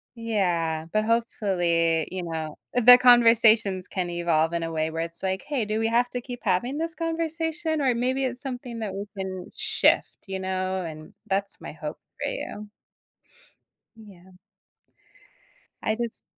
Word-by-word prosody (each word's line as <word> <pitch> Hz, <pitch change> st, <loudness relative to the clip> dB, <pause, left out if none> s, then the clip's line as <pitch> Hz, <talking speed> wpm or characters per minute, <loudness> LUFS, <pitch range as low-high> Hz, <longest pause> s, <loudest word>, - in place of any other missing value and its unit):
yeah, 175 Hz, -8 st, -1 dB
but 215 Hz, 0 st, +1 dB
hopefully, 175 Hz, -8 st, +1 dB
you 185 Hz, 0 st, -3 dB
know 160 Hz, -2 st, -5 dB, 0.2 s
the 245 Hz, 0 st, +9 dB
conversations 230 Hz, -6 st, +5 dB
can 180 Hz, -2 st, -3 dB
evolve 170 Hz, -2 st, +1 dB
in 170 Hz, -, -1 dB
a 165 Hz, -, -3 dB
way 160 Hz, 0 st, -1 dB
where 165 Hz, +1 st, -3 dB
it's, 170 Hz, +2 st, -8 dB
like, 190 Hz, 0 st, -1 dB
"Hey, 280 Hz, -6 st, 0 dB
do 215 Hz, +1 st, -1 dB
we 225 Hz, -, +1 dB
have 240 Hz, +2 st, +2 dB
to 245 Hz, -, -4 dB
keep 245 Hz, 0 st, -8 dB
having 235 Hz, +7 st, 0 dB
this 330 Hz, +1 st, -2 dB
conversation? 325 Hz, -1 st, -2 dB
Or 255 Hz, -3 st, +2 dB
maybe 260 Hz, +3 st, 0 dB
it's 250 Hz, 0 st, -4 dB
something 250 Hz, -3 st, -6 dB
that 210 Hz, -4 st, -4 dB
we 200 Hz, +1 st, -4 dB
can 185 Hz, -1 st, -5 dB
shift." -, -, +2 dB
You 190 Hz, 0 st, -4 dB
know? 185 Hz, 0 st, -2 dB
And 155 Hz, -2 st, -9 dB
that's 200 Hz, 0 st, -2 dB
my -, -, -7 dB
hope -, -, -7 dB, 0.2 s
for -, -, -1 dB
you. 210 Hz, -, -6 dB, 1.3 s
Yeah. 190 Hz, -4 st, -16 dB, 1.5 s
I 215 Hz, -, +1 dB
just 235 Hz, 0 st, -5 dB
210 Hz, 160 wpm, -25 LUFS, 175-245 Hz, 1.5 s, the